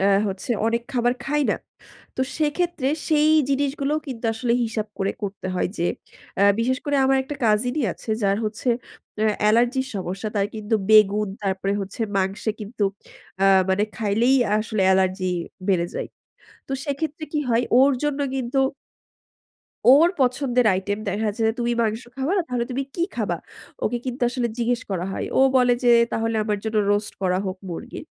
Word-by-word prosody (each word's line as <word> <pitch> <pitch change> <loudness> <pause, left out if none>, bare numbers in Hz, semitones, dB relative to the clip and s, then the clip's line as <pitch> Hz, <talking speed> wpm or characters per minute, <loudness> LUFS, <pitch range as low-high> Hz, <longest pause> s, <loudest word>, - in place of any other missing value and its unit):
অ্যা 195 +1 +3 0.2
হচ্ছে 190 +4 -5 0.2
অনেক 235 +1 0
খাবার 245 -1 +2
খায় 295 +1 +1
না। - - +1 0.6
তো - - -2 0.2
সেক্ষেত্রে 315 -2 0 0.2
সেই 305 0 +4 0.2
জিনিসগুলোও 280 +1 0
কিন্তু 245 -3 -7
আসলে 235 +1 0
হিসাব 220 -2 -3
করে 195 0 0
করতে 195 -1 -5
হয় 180 - 0
যে, 170 - +1 0.5
অ্যা 200 - +5
বিশেষ 255 +3 +1
করে 290 -1 +1
আমার 270 0 +4
একটা 285 +2 -6
কাজিন-ই 245 +7 +2
আছে - - -8
যার 195 0 +2
হচ্ছে 215 +4 -3 0.5
অ্যা 220 - +3
অ্যালার্জির 240 +5 +3
সমস্যা, 190 +3 -4
তার 200 -1 +2
কিন্তু 215 +1 -2 0.2
বেগুন, 210 -1 +5
তারপরে 195 0 -1
হচ্ছে 195 +3 -7 0.2
মাংসে 195 +3 0
কিন্তু 210 0 -2 0.6
আ - - +5 0.2
মানে 195 +2 +2
খাইলেই 225 +5 +2
আ - - +1
আসলে 220 -2 -1
অ্যালার্জি 190 0 +2 0.4
বেড়ে 175 -3 +2
যায়। - - -4 0.6
তো - - -4
সেক্ষেত্রে 295 +2 -3
কি 305 - 0
হয় 235 +1 +3
ওর 275 +2 +6
জন্য 295 -1 -1 0.2
কিন্তু 255 +1 -1 1.3
ওর 295 +6 +7
পছন্দের 250 -1 +2
আইটেম 205 +2 -2
দেখাচ্ছে 215 +2 -1
"তুমি 240 0 0
মাংস 220 +1 -1
খাবা 270 +6 -1
না 375 - +2
তাহলে 245 -1 -1
তুমি 260 +2 -1
কি 340 - -1
খাবা?" - - -1 0.5
ওকে 240 +2 0
কিন্তু 255 +1 -4
আসলে 245 -1 -1
জিজ্ঞেস 240 0 0
করা 180 -2 -2
হয়। - - -3
ও - - +6 0.2
বলে 250 -1 +4
যে 240 - +6 0.2
"তাহলে 225 0 0
আমার 210 -1 -1
জন্য 220 0 -2 0.2
রোস্ট 205 +1 -1
করা 185 -1 +1
হোক 185 0 -3
মুরগির।" 240 - -7
230 Hz, 170 wpm, -23 LUFS, 200-265 Hz, 1.3 s, ওর